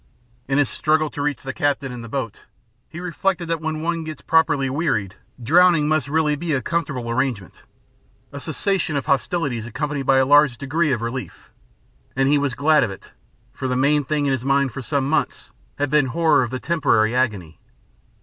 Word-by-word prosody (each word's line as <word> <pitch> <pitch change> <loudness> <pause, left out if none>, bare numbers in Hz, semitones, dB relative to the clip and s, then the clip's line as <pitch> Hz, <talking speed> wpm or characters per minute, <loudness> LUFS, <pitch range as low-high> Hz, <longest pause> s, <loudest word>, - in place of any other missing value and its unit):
In 135 +1 0
his 145 -2 +3
struggle 155 +2 0
to 145 - -5
reach 145 -3 -2
the 130 -1 -5
captain 140 -2 -1
and 120 -1 -7
the 115 - -9
boat, 115 -5 -5 0.4
he 170 - -8
reflected 180 0 -2
that 165 -1 -1
when 160 0 -3
one 165 0 -1
gets 155 -3 -8
properly 145 -4 +2
wearied, 130 - -1 0.3
drowning 165 +2 +4
must 155 -3 +1
really 150 0 +1
be 160 +1 -3
a 130 - 0
comfortable 140 -8 -2
arrangement, 115 - -2 0.7
a 140 - -6
cessation 160 +2 -1
of 140 - -3
hostilities 135 -3 -1
accompanied 140 +2 -3
by 135 - +5
a 130 - +4
large 145 -2 +5
degree 150 +3 0
of 120 -3 -1
relief, 120 +2 -6 0.6
and 135 0 +2
he 145 +1 +3
was 140 -4 -1
glad 155 +1 +3
of - - -1
it, 95 - -11 0.4
for 130 -1 -4
the 125 -1 -1
main 145 +3 +2
thing 145 +1 -1
in 140 - +1
his 130 -2 -1
mind 135 0 +2
for 130 - -6
some 135 +1 -1
months 155 - -1 0.3
had 145 -1 -1
been 150 -3 +3
horror 155 +2 +3
of 120 - -1
the 130 - -4
temporary 120 -9 +1
agony. 105 -11 -1
140 Hz, 195 wpm, -21 LUFS, 130-155 Hz, 0.7 s, by